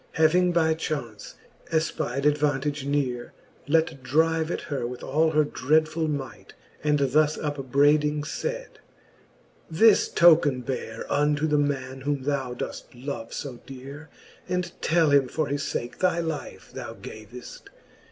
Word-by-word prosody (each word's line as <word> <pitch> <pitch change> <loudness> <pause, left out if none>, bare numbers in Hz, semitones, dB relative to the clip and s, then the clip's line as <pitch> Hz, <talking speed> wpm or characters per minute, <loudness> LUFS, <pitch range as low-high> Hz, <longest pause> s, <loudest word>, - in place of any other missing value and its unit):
Having 175 +3 +4
by 160 -2 +3
chaunce 135 -9 -5 0.4
efpide 145 -4 -1
'advantage 145 -1 +1
neare, 130 -4 -1 0.3
Let 160 -2 +1
drive 160 +4 +1
at - - -2
her 135 -6 -3
with 125 0 -8
all 155 +4 +2
her 155 -1 +3
dreadfuU 155 +4 +1
might, 135 -6 -6 0.3
And 150 0 +3
thus 150 +2 +2
upbraiding 145 +1 +2
iaid; - - -4 1.0
This 205 +7 +5
token 155 -6 +5
beare 130 +1 -5
Unto 150 +1 +1
the 150 -1 +2
man, 135 -2 -2
whom 140 -1 -2
thou 135 -3 -2
doeft 125 - -7
love 120 -3 -6
fo 130 -4 -6
deare 135 +4 -10 0.4
j 180 - -1
And 180 -1 -2
tell 160 -2 +3
him 140 -2 +4
for 155 - -1
his 145 0 -2
fake 120 +1 -4
thy 185 -2 +2
life 160 -3 -5
thou - - -7
gaveft. 110 +3 -11
145 Hz, 140 wpm, -26 LUFS, 135-160 Hz, 1.0 s, This